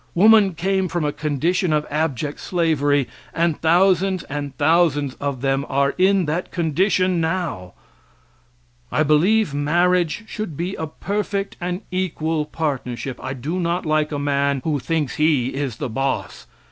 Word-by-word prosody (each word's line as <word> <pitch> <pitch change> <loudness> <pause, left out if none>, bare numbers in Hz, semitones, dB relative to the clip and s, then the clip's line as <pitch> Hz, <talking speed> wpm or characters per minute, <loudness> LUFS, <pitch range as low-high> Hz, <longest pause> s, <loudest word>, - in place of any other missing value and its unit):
Woman 205 -1 +6
came 190 +3 0
from 175 -2 -2
a 145 - +1
condition 155 +4 0
of 150 0 +1
abject 150 -2 -2
slavery 145 -6 +1 0.3
and 170 -2 0
thousands 185 +2 +3
and 145 -1 -6
thousands 145 -3 +2
of 140 -3 -2
them 135 0 +1
are 140 +1 +1
in 190 0 +3
that 165 +4 -2
condition 180 +2 +1
now. 160 - -2 1.2
I 155 - +2
believe 165 +5 +3
marriage 175 +5 +1
should 215 -11 -5
be 180 +3 -2
a 160 - -4
perfect 200 +4 -3
and 180 +2 -3
equal 160 -4 -1
partnership. 135 -5 -3
I 130 - -4
do 150 +8 -3
not 170 0 -1
like 155 0 +1
a 145 - -2
man 140 -1 0
who 150 -3 0
thinks 150 -1 -2
he 150 -5 +2
is 135 -4 -3
boss. 135 - -3
160 Hz, 145 wpm, -21 LUFS, 145-180 Hz, 1.2 s, Woman